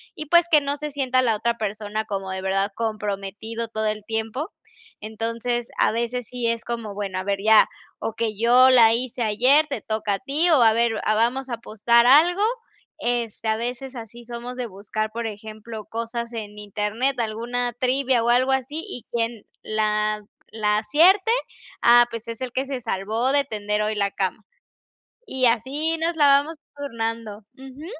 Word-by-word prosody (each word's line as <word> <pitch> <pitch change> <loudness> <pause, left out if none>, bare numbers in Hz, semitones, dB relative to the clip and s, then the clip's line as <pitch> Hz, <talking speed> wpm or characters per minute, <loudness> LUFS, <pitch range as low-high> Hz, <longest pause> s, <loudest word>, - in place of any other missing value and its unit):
Y, 305 - -6
pues, 340 +3 +4
que 305 - +7
no 280 0 -2
se 300 +1 -6
sienta 260 -2 +1
la 235 -3 +2
otra 235 +2 -1
persona 215 0 -3
como 195 -3 -5
de 190 0 -4
verdad 195 +2 0
comprometido 215 +1 -4
todo 220 -1 -3
el 215 0 -2
tiempo. 225 - -3 0.5
Entonces, 230 +2 -3
a - - +3
veces 235 +1 -2
sí 245 -2 -2
es 230 0 -1
como: 230 -3 -4
"Bueno, 195 -2 -4
a - - -4
ver 200 0 -1
ya, 220 0 +6 0.3
okey, 225 -1 -3
yo 245 +4 +6
la 235 -3 +7
hice 245 +1 -2
ayer, 250 +8 +4
te 275 -5 -4
toca 215 -1 -1
a - - -7
ti 290 +6 +1
o 305 -6 +5
a 225 -1 +6
ver 235 +1 +2
a 215 - +2
vamos 245 +4 +1
a - - -3
apostar 235 +1 +2
algo". 335 +8 +5 0.6
Este, 235 -2 -2
a 220 - +1
veces 250 +3 -4
así, 235 +1 -10
somos 240 +1 -7
de 250 -2 -3
buscar, 215 +2 -4
por 230 +1 -4
ejemplo, 215 +1 -8
cosas 230 +1 -5
en 210 -2 -7
internet, 210 +6 -2
alguna 240 +2 -2
trivia 255 0 +1
o 235 - +1
algo 255 +2 +3
así. 265 +4 -2
Y 250 - -6
quien 230 -1 -2 0.2
la 215 0 0 0.3
la 210 -1 +1
acierte, 360 - +4 0.5
ah, 240 0 +7
pues, 230 0 -6
es 230 - -6
el 255 -1 -4
que 265 +2 -1
se 270 -2 -4
salvó 220 +5 -1
de 285 0 +4
tender 210 -3 -2
hoy 215 +1 -1
la 200 -1 0
cama. 195 +2 -3 0.8
Y 260 -1 +1
así 275 +8 +1
nos 330 +2 0
la 295 -2 +5
vamos 285 +3 +3 0.2
turnando. 230 -6 -4 0.2
Ujú. 270 +3 -11
230 Hz, 180 wpm, -23 LUFS, 215-255 Hz, 0.8 s, que